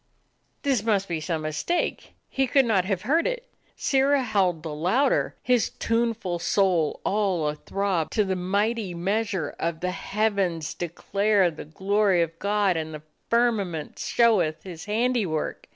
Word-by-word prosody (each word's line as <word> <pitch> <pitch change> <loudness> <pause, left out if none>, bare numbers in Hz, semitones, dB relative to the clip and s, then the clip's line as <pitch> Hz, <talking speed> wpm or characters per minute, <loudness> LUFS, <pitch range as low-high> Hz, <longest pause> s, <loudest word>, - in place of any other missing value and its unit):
This 270 -6 +2
must 205 -3 +1
be 165 -2 -3
some 155 0 -2
mistake; 155 - -2
he 270 0 0
could 270 +2 +4
not 200 -6 +2
have 190 -2 -2
heard 315 +9 +2
it. - - -4 0.3
Sirrah 275 0 +2
howled 190 -8 +1
the 160 -2 -4
louder, 205 - +1
his 250 -2 +2
tuneful 230 -6 -1
soul 175 -4 +1
all 195 -6 +1
athrob 185 +2 -2
to 215 - +1
the 190 -1 -1
mighty 200 +2 -1
measure 190 -2 -1
of 165 -1 -2
"The 180 0 -1
heavens 195 -5 -1
declare 195 +2 +1
the 155 - -9
glory 190 +2 +2
of 165 0 -7
God, 200 -3 +1
and 160 -1 -4
the 150 - -10 0.3
firmament 210 -10 0
showeth 180 -10 +2
His 170 -4 -8
handiwork." 215 -7 -1
195 Hz, 145 wpm, -25 LUFS, 170-225 Hz, 0.3 s, could